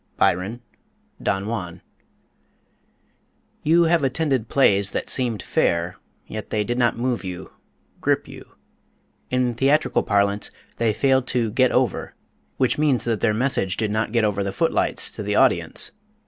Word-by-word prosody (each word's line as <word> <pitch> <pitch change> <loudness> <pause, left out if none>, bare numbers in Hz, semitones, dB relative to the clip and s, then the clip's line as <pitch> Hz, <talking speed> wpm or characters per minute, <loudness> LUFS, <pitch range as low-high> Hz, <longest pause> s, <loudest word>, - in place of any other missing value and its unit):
BYRON, 100 +7 0 0.6
Don 95 +1 -1
Juan. 90 -6 -5 1.8
You 170 +3 +4
have 165 -2 +2
attended 135 -4 0
plays 100 -7 +3
that - - -3
seemed 120 -6 -1
fair, 85 +1 0 0.3
yet 110 -1 -7
they 105 -1 0
did 120 +3 -2
not 120 -1 +2
move 120 -1 -1
you, 90 0 -7 0.5
grip - - 0
you. - - -12 0.8
In 125 -1 +1
theatrical 135 +6 +2
parlance, 100 0 +1 0.3
they 115 -1 +2
failed 130 +3 +2
to 120 -3 0
"get 130 +2 +3
over," - - 0 0.4
which 130 +2 +1
means 145 -5 +2
that 115 -3 -1
their 115 - +2
message 105 -5 0
did 110 -2 -1
not 110 0 -1
get 115 -1 +2
over 100 -1 0
the 100 - -2
foot 165 +12 0
lights - - 0
to - - -7
the - - -1
audience. - - +3
115 Hz, 150 wpm, -23 LUFS, 100-130 Hz, 1.8 s, You